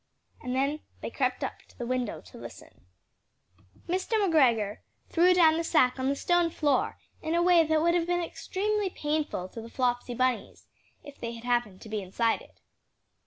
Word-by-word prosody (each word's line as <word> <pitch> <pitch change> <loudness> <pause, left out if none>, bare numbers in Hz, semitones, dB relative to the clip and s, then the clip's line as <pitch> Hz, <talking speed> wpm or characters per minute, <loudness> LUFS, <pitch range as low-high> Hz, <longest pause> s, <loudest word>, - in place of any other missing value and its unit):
And 250 0 -3
then 280 +3 0 0.2
they - - -5
crept - - -1
up - - -4
to - - -23
the 240 - -4
window 250 -2 -2
to - - -14
listen. 90 - -12 1.0
Mr. 370 +6 -2
McGregor 260 - +3 0.3
threw 350 +2 +4
down 325 -3 +6
the 335 - 0
sack 260 -6 +3
on 260 +1 +1
the 280 - +1
stone 350 +3 +2
floor 290 -4 0 0.2
in 320 +1 -1
a 345 - +3
way 350 -2 +6
that 315 0 +2
would 340 0 +3
have 345 -1 +1
been 350 0 +1
extremely 410 +4 -2
painful 295 - -2
to 230 - -8
the 230 - -10
Flopsy 245 -1 -1
Bunnies, 255 0 -1 0.4
if 285 -1 -12
they 235 0 -4
had 230 0 -10
happened 240 -6 0
to - - -10
have - - -12
been 210 -3 -2
inside 225 +5 0
it. - - -19
285 Hz, 190 wpm, -28 LUFS, 240-340 Hz, 1.0 s, down